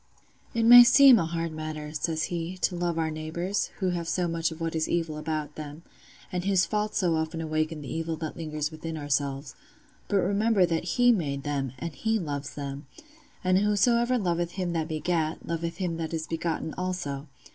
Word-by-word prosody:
"'It 230 - +2
may 240 +1 +11
seem 265 -1 +8
a 165 - 0
hard 165 0 -2
matter,' 155 -1 -6
says 160 +1 -1
he, 170 +2 -3
'to 180 - 0
love 175 -1 -1
our 160 -1 0
neighbours, 170 +5 -2
who 185 -3 0
have 170 -2 -3
so 180 0 0
much 165 0 0
of 160 -1 -9
what 165 -1 -2
is 160 0 0
evil 165 -3 -1
about 155 -1 -3
them, 150 +1 -8 0.5
and 180 -1 -2
whose 195 -2 +3
faults 210 0 -1
so 175 -5 +2
often 160 +1 -2
awaken 155 0 -2
the - - -6
evil 165 0 -2
that 155 -1 -5
lingers 155 -2 -3
within 160 +1 -6
ourselves; 140 -2 -2 0.5
but 205 - +1
remember 200 +1 +3
that 165 0 -2
He 245 0 +6
made 140 -10 -1
them, 140 -3 -2
and 170 +4 -5
He 220 +11 0
loves 145 -6 -4
them; 140 0 -6 0.6
and 185 0 +3
whosoever 235 +4 +3
loveth 175 -4 -1
him 180 -3 -2
that 160 -2 -1
begat, 160 0 -1
loveth 165 0 -3
him 175 -3 -2
that 165 0 -3
is 160 -1 -3
begotten 165 -1 -3
also. 175 -6 -3
165 Hz, 190 wpm, -27 LUFS, 155-185 Hz, 0.6 s, may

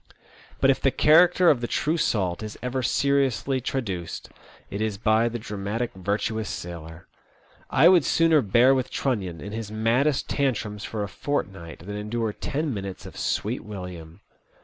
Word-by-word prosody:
But 135 - +5
if 135 - -1
the 135 - +4
character 175 +5 +5
of 130 -5 0
the 120 - -2
true 155 +6 0
salt 95 - 0
is 110 -1 -7
ever 125 +1 -1
seriously 135 0 +1
traduced, 100 -11 -4 0.4
it 100 - -3
is 110 -2 -1
by 110 +2 +2
the 120 - -4
dramatic 105 +2 -3
virtuous 105 +3 -2
sailor. 85 -1 -7 0.6
I 150 +6 +5
would 180 -3 +6
sooner 165 +1 +4
bear 120 +5 +5
with 130 -1 -1
Trunnion 95 - -2
in 100 - -7
his 110 -1 -5
maddest 115 +7 +1
tantrums 110 -7 -1
for 110 -2 -3
a - - -3
fortnight 95 - -4
than 105 +1 -5
endure 110 +1 -2
ten 145 +4 -2
minutes 100 -2 -6
of - - -10
Sweet 110 +5 -2
William. 90 -4 -8
110 Hz, 160 wpm, -25 LUFS, 100-135 Hz, 0.6 s, would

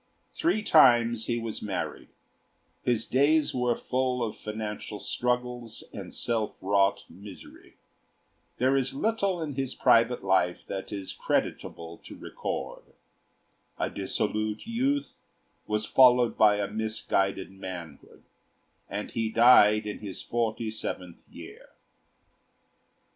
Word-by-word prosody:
Three 320 -10 0
times 120 - +5
he 120 - 0
was 115 -2 -4
married; 95 -4 -4 0.7
his 120 -3 0
days 145 +4 +3
were 125 -2 +1
full 125 0 -1
of 110 - -3
financial 105 -1 -6
struggles 125 -2 -2
and - - -7
self 115 -3 -2
wrought 100 +1 +2
misery; 100 -1 -12 0.8
there 130 +2 +2
is 135 0 0
little 200 0 0
in 150 -2 -4
his 135 -1 -3
private 115 0 +3
life 95 -2 +1
that 95 -1 -6
is 100 -2 -4
creditable 85 0 -3
to - - -12
record: - - -5 1.0
a - - -2
dissolute 105 +2 -2
youth 265 +5 -1 0.4
was 105 0 -1
followed 125 -2 +5
by 105 -1 +5
a 100 -1 -1
misguided 105 -3 -1
manhood, 90 -6 -9 0.7
and 100 +1 -5
he 115 -1 -1
died 110 -2 +6
in 105 - -5
his 100 -3 -7
forty 115 -1 -2
seventh 90 -5 -6
year. - - -12
110 Hz, 115 wpm, -28 LUFS, 105-125 Hz, 1.0 s, died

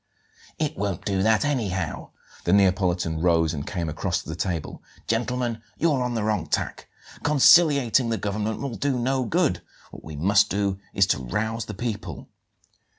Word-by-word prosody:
"It 155 0 -1
won't 100 -7 -3
do 95 -2 0
that 110 +5 +3
anyhow." 100 - -2 0.4
The 85 - +2
Neapolitan 90 -4 +2
rose 85 -2 +3
and 70 -2 -5
came 85 -4 -3
across 75 - -2
to - - -11
the 80 - -4
table. 85 -2 -3 0.2
"Gentlemen, 120 0 -1 0.2
you're 150 -5 +2
on 125 -1 -1
the 110 - -1
wrong 105 -7 0
tack. - - -2 0.3
Conciliating 140 -5 +5
the 115 - 0
government 105 +2 -3
will 140 -3 -3
do 135 +2 -1
no 130 +1 0
good. 110 - +1 0.3
What - - -11
we 80 -1 -8
must 100 +7 +3
do 100 -1 -1
is 95 - +3
to 95 - 0
rouse 110 - -2
the 105 - -7
people." 100 - -5
105 Hz, 165 wpm, -25 LUFS, 90-120 Hz, 0.4 s, Conciliating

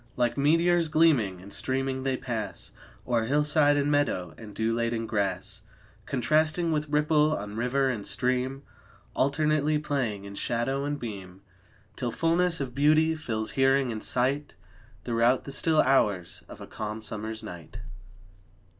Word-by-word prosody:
Like 120 -1 +1
meteors, 165 +4 +3
gleaming 145 - +3
and 100 - -9
streaming, 130 0 -2
they 135 -1 -1
pass 120 -5 -5 0.4
O'er 115 -2 +1
hillside 145 +2 +3
and 145 +1 +1
meadow, 130 - 0
and 110 -3 -11
dew 110 +1 0
laden 115 0 -1
grass, 100 -4 -2 0.5
Contrasting 155 +5 +1
with 150 -1 -1
ripple 150 +1 +2
on 105 +1 -7
river 125 +4 +1
and 120 -6 -2
stream, 130 +2 -1 0.5
Alternately 150 +2 +2
playing 130 -9 -2
in 100 - -8
shadow 120 +6 -1
and 145 0 -3
beam, 95 -4 -8 0.5
Till 125 - -2
fullness 165 +6 +1
of 135 -3 -4
beauty 155 +4 +3
fills 110 -9 -3
hearing 135 -1 +2
and 110 -1 -5
sight 135 +4 0 0.5
Throughout 120 +2 +2
the 140 - -8
still 155 +3 +3
hours 105 -10 +1
of - - -11
a - - -7
calm 110 0 -6
summer's 110 0 -5
night. 85 -3 -9
130 Hz, 145 wpm, -27 LUFS, 110-150 Hz, 0.5 s, meteors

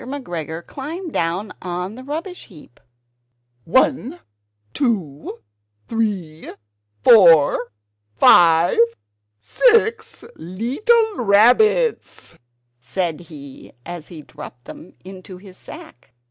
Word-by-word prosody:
McGregor 170 - -7
climbed 320 +5 -8
down 170 +5 -3
on 180 +1 -5
to 220 - -13
the 255 - -10
rubbish 325 +7 -7
heap 155 - -18 0.9
"One, 260 - 0 0.5
two, 165 - -3 0.5
three, 195 -9 -4 0.5
four! 165 - +5 0.5
five! 170 +1 +5 0.6
six 450 - +1
leetle 365 - -1
rabbits!" 250 - +2 0.4
said 160 +6 -4
he 145 -6 -13
as 175 -3 -9
he 160 -4 -12
dropped 135 -5 -13
them 170 - -13
into 185 -1 -11
his 185 0 -15
sack. 320 - -14
190 Hz, 90 wpm, -19 LUFS, -, 0.9 s, four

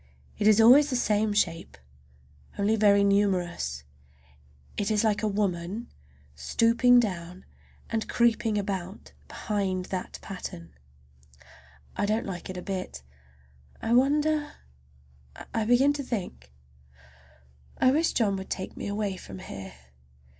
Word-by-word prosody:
It 210 - +2
is 215 0 +6
always 265 +6 +7
the 255 - -1
same 215 -3 +1
shape, 170 - -1 0.8
only 205 +2 +2
very 200 -2 +4
numerous. 180 - 0 0.9
And - - -2
it 205 - -1
is 210 0 +2
like 210 -2 +1
a 215 - 0
woman 200 +2 -2 0.4
stooping 230 - +3
down 180 -4 -4 0.4
and 225 -1 -3
creeping 235 -2 +2
about 195 -1 -5 0.2
behind 190 -3 -2
that 185 -1 -4
pattern. 85 - -8 1.2
I 205 - -1
don't 220 +2 0
like 185 -2 -6
it 185 - -6
a 180 - -6
bit. 185 - -5 0.8
I 225 - -1
wonder—I 70 - -2
begin 250 +5 +4
to 290 - -4
think—I 65 - -6
wish 320 +4 +1
John 205 -5 +1
would 190 - -8
take 190 - -5
me - - -6
away 205 -2 -2
from 100 - -10
here! 95 0 -9
200 Hz, 125 wpm, -27 LUFS, -, 1.2 s, always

